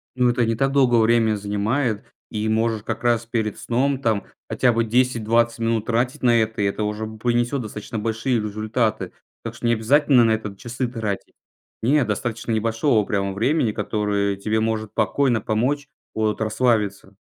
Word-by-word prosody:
Ну 125 -1 +3
это 120 -1 +1
не 115 - 0
так 135 +4 +1
долго 130 -4 +3
время 115 -1 +3
занимает. 105 +3 -1 0.3
И 110 0 -2
можешь 110 -1 0
как 110 +1 -4
раз 120 -1 +2
перед 110 -2 -2
сном, 135 +3 0
там 110 -6 0 0.2
хотя 125 -2 +2
бы 115 0 +2
10-20 115 -1 +1
минут 115 -1 0
тратить 120 +3 -1
на 120 -1 +5
это, 110 -1 -2
и - - +2
это 100 +2 -1
уже 105 +1 -2
п 110 0 -10
принесет 120 +3 0
достаточно 105 0 -6
большие 115 +3 -1
результаты. 110 +1 -1 0.3
Так 115 0 -6
что 115 - -7
не 120 - +4
обязательно 130 +2 +4
на 115 - +3
это 110 -2 -2
часы 125 +3 -3
тратить. 110 -5 -4 0.5
Не, 140 +5 +3
достаточно 115 +2 -3
небольшого 115 +1 +1
прямо 100 -1 -1
времени, 120 +2 +1
которое 100 -2 -1
тебе 110 +3 -1
может 110 -1 -2
спокойно 120 +2 +1
помочь 130 +8 -1 0.3
от 110 0 -1
расслабиться. 105 -4 0
115 Hz, 170 wpm, -22 LUFS, 110-120 Hz, 0.5 s, на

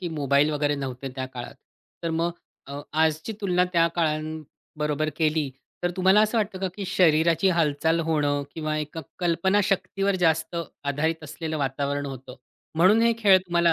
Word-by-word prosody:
की 175 - -3
मोबाईल 145 -1 +2
वगैरे 145 -1 0
नव्हते 135 -1 -5
त्या 130 0 -3
काळात. 125 -2 -8 0.5
तर 165 - -1
मग 170 +1 +1 0.4
अ, 140 +1 -6
आजची 160 +6 +1
तुलना 180 -2 +2
त्या 170 -1 +4
काळांबरोबर 155 -1 -2
केली. 155 -2 +1 0.3
तर 175 - +1
तुम्हाला 190 +3 +5
असं 215 +2 +2
वाटतं 205 -3 -2
का, 190 -1 -1
की 200 - -5
शरीराची 170 -1 +3
हालचाल 160 +1 +1
होणं, 145 -2 +1
किंवा 155 -1 -2
एका 150 +2 -5 0.2
कल्पनाशक्तीवर 190 +2 +1
जास्त 160 +1 +1 0.3
आधारित 155 +3 -1
असलेलं 155 +1 -5
वातावरण 140 +1 -2
होतं. 130 -1 -8 0.4
म्हणून 190 +7 +5
हे 235 0 +4
खेळ 200 -4 +6
तुम्हाला 170 -2 +2
160 Hz, 155 wpm, -25 LUFS, 145-180 Hz, 0.5 s, खेळ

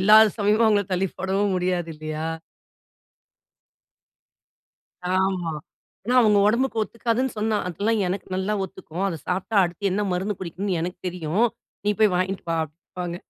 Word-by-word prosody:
இல்லாத 215 +3 +8
சமயம் 210 +2 +3
அவங்கள 205 -2 +3
தள்ளி 185 +1 +1
போடவும் 195 +1 +1
முடியாது 180 -2 -1
இல்லையா? 155 +1 -4 2.8
ஆமா. 185 -3 +1 0.5
ஏன்னா 245 +4 0
அவங்க 210 -3 +5
உடம்புக்கு 235 +2 +1
ஒத்துக்காதுன்னு 235 +3 -1
சொன்னா 215 0 +1
"அதெல்லாம் 205 +6 0
எனக்கு 185 +2 -3
நல்லா 190 +3 -1
ஒத்துக்கும். 175 -1 -7
அத 170 - -3
சாப்ட்டா 190 +4 -1
அடுத்து 175 +3 -2
என்ன 200 +3 0
மருந்து 195 +3 -1
குடிக்கணும்னு 185 +1 -2
எனக்கு 175 +2 -4
தெரியும். 180 +4 0 0.4
நீ 210 - +3
போய் 215 -4 +5
வாங்கிட்டு 190 +1 -1
வா" 165 - +1
அப்படின்பாங்க. 170 +3 -7
190 Hz, 135 wpm, -24 LUFS, 180-210 Hz, 2.8 s, இல்லாத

